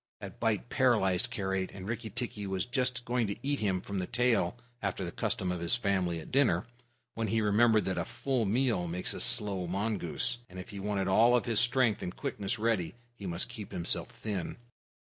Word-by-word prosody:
That - - -9
bite - - 0
paralyzed 95 +5 +3
Karait, 95 -4 -1
and 95 -1 -7
Rikki 115 0 -3
tikki 105 -2 -4
was 95 -1 -1
just 125 -1 0
going 120 -2 +1
to 100 - -2
eat 145 0 +1
him 100 -3 +1
up 90 - -8
from 100 -1 -3
the 90 - -2
tail, 120 -4 +2 0.2
after 95 -2 -2
the 85 - -4
custom 105 -4 -1
of 90 - -2
his 85 +6 +2
family 95 -7 0
at 80 - -10
dinner, 125 -11 +3 0.5
when 115 -1 -2
he 110 +2 +1
remembered 110 +1 +4
that 95 - -1
a - - -1
full 130 -4 -1
meal 110 -4 +1
makes 90 +2 -2
a - - -4
slow 95 -4 +2
mongoose, 100 +4 -1
and 95 - -11
if 95 +3 -7
he 100 -3 -7
wanted 100 -1 -1
all 120 +5 +5
his 115 -3 +1
strength 120 -2 +3
and 90 - -4
quickness 100 +3 -2
ready, 110 -4 0 0.2
he 100 -5 -8
must 90 +6 +1
keep 115 -4 -8
himself 85 -2 -2
thin. 100 -6 -4
105 Hz, 200 wpm, -31 LUFS, 95-120 Hz, 0.5 s, all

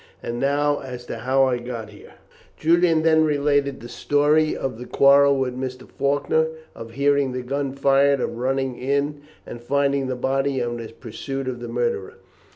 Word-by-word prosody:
And 120 0 -4
now 145 +2 +1
as 125 -2 -8
to - - -6
how 135 +1 +2
I 125 -2 +1
got 120 -3 -7
here." 105 - -15 0.4
Julian 165 0 +3
then 160 -1 +4
related 145 -2 +1
the 120 - -8
story 145 +5 +1
of 130 -4 -4
the 125 - -8
quarrel 140 0 +5
with 130 -2 -1
Mr. 130 0 -6
Faulkner, 145 +3 0 0.3
of 115 0 -10
hearing 140 0 +1
the 125 0 -4
gun 140 +2 -2
fired, 140 0 +3
of 115 - -3
running 130 0 -1
in 140 +2 -1 0.2
and 120 - -9
finding 140 +1 0
the 130 - -2
body, 135 +2 0
and 120 -1 -2
of 120 - -5
his 115 -1 -8
pursuit 135 +4 -6
of 125 -2 -4
the 120 - -6
murderer. 455 -2 -2
135 Hz, 180 wpm, -23 LUFS, 125-145 Hz, 0.4 s, quarrel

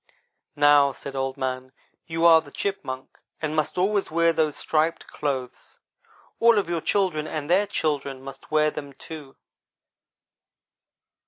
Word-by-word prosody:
"'Now,' 145 -1 +5
said 135 +1 -9
Old 135 0 -2
man, 130 -1 -3 0.3
'you 165 0 0
are 165 -1 +8
the 150 - -14
Chipmunk, 140 -7 -5 0.2
and 155 -1 -2
must 155 +2 -1
always 195 +2 +1
wear 165 +1 +3
those 155 -2 +1
striped 160 +1 0
clothes. 130 -4 -5 0.6
All 230 -1 +6
of 200 - +1
your 170 -1 -1
children 180 -6 0
and 150 -2 -4
their 190 +5 +3
children, 145 -7 -2
must 135 0 -11
wear 155 0 +3
them, 140 -2 -7
too.' 145 0 -10
155 Hz, 140 wpm, -25 LUFS, 140-165 Hz, 0.6 s, are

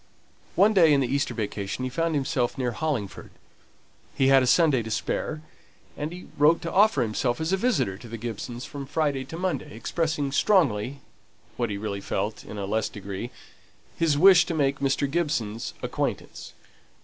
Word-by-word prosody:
One 215 +2 +5
day 165 -6 +6
in 140 - +4
the 130 - +1
Easter 140 +1 -1
vacation 105 +1 -3
he 130 - -1
found 165 +3 0
himself 130 -3 0
near 125 -2 -1
Hollingford; 120 -6 -3 0.9
he 135 0 +3
had 135 -1 +6
a 130 - +1
Sunday 150 -4 +4
to 110 - -6
spare, 155 +7 -2 0.5
and 150 +2 -4
he 180 +1 -9
wrote 150 +3 +5
to 170 - -3
offer 200 - +4
himself 120 +3 -1
as 160 +3 -1
a - - +6
visitor 185 - 0
to 120 - -11
the 115 +1 -6
Gibsons 120 +2 -6
from 140 -1 -7
Friday 145 -2 0
till 160 - -8
Monday, 175 - -3
expressing 150 +4 -1
strongly 140 - +2 0.5
(what 120 -2 -1
he 100 - -3
really 100 -1 -4
felt, 105 +2 -3
in 105 - -9
a 100 - -3
less 110 +2 -1
degree,) 100 +3 -6 0.7
his 155 -3 +2
wish 185 +2 +8
to 165 - -2
make 140 -2 +1
Mr. 140 +1 +1
Gibson's 135 -9 -2
acquaintance. - - -4
135 Hz, 175 wpm, -26 LUFS, 115-160 Hz, 0.9 s, wish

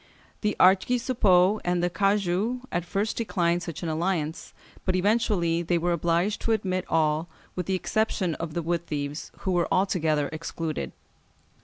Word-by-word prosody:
The 210 -1 0
archisuppôts 200 -1 +4
and 175 0 0
the 175 - +2
cagoux 200 +4 +1
at 175 - -1
first 205 +4 -1
declined 175 -6 +1
such 170 -1 -6
an 165 - -2
alliance, 160 -1 -2 0.3
but 185 - 0
eventually 185 -4 +2
they 175 0 +1
were 175 +1 0
obliged 170 +4 +1
to 230 - +1
admit 185 -4 -1
all, 160 +1 +1 0.3
with 180 - -3
the 190 - +1
exception 190 -2 0
of 165 -2 -5
the 170 - -1
wood 170 +1 -1
thieves, 145 0 -4
who 190 - -1
were 175 -1 +2
altogether 160 -6 +1
excluded. 160 0 -4
175 Hz, 155 wpm, -26 LUFS, 165-195 Hz, 0.3 s, archisuppôts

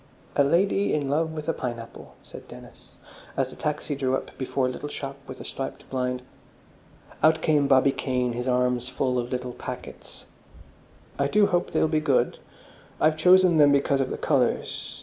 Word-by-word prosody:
"A 140 - +5
Lady 195 +6 +2
in 140 -2 -1
Love 160 +2 +1
with 155 -1 -6
a 165 - +1
Pineapple," 120 -2 -7
said - - -12
Dennis, - - -14 0.4
as - - 0
the - - -11
taxi 150 0 -3
drew 130 -1 0
up - - -6
before 130 0 -1
a - - +1
little 145 +3 -6
shop 140 -1 -6
with - - -9
a - - -8
striped 135 0 -6
blind. 125 -1 -2 1.0
Out 160 0 +4
came 150 -3 +3
Bobby 135 0 +5
Kane, 125 -2 -1
his 125 +2 -4
arms 125 0 +1
full 125 -1 0
of 120 0 -4
little 125 -1 -3
packets. - - -9 0.9
"I 140 - +2
do 210 +7 +4
hope 180 -3 0
they'll - - +2
be 155 0 +1
good. 145 -4 +1 0.6
I've 155 0 +3
chosen 180 +1 +5
them 145 -2 +6
because 140 0 +2
of 130 - -1
the - - -4
colours. 130 -5 -1
140 Hz, 180 wpm, -25 LUFS, 125-155 Hz, 1.0 s, them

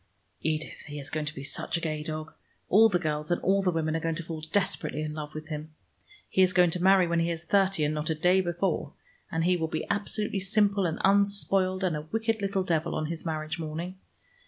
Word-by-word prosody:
Edith, 155 0 -2
he 145 0 -6
is 140 -1 -5
going 155 -1 -2
to 155 - -4
be 135 - -6
such 140 - -2
a - - -2
gay 155 -2 -2
dog! 155 +1 -5 0.4
All 225 +4 +7
the 180 - +2
girls 150 -3 -2
and 175 - +1
all 195 +1 +3
the 190 - +2
women 160 -2 0
are - - +1
going 165 0 -1
to 170 - -5
fall 160 -1 -6
desperately 180 -2 -1
in 155 -1 -4
love 150 0 -6
with 155 +1 -7
him. 155 0 -6 0.5
He 190 - +2
is 185 -1 +5
going 180 -2 +5
to 180 - -2
marry 190 0 +6
when 170 0 +1
he 165 +1 +1
is 165 -1 -3
thirty, 195 -4 +2
and 150 +1 +1
not 150 +1 -2
a 160 - +1
day 180 +4 +4
before, 175 -4 -1 0.4
and 165 0 0
he 180 +1 +3
will 165 -2 -1
be 160 0 -3
absolutely 205 0 -1
simple 200 0 +2
and 160 - -2
unspoiled 195 -1 +2
and 180 -4 +1
a 150 - -3
wicked 225 -1 0
little 195 -1 0
devil 170 -2 0
on 155 0 -2
his 165 0 -5
marriage 155 0 -3
morning. 165 +4 -5
170 Hz, 235 wpm, -28 LUFS, 155-190 Hz, 0.5 s, All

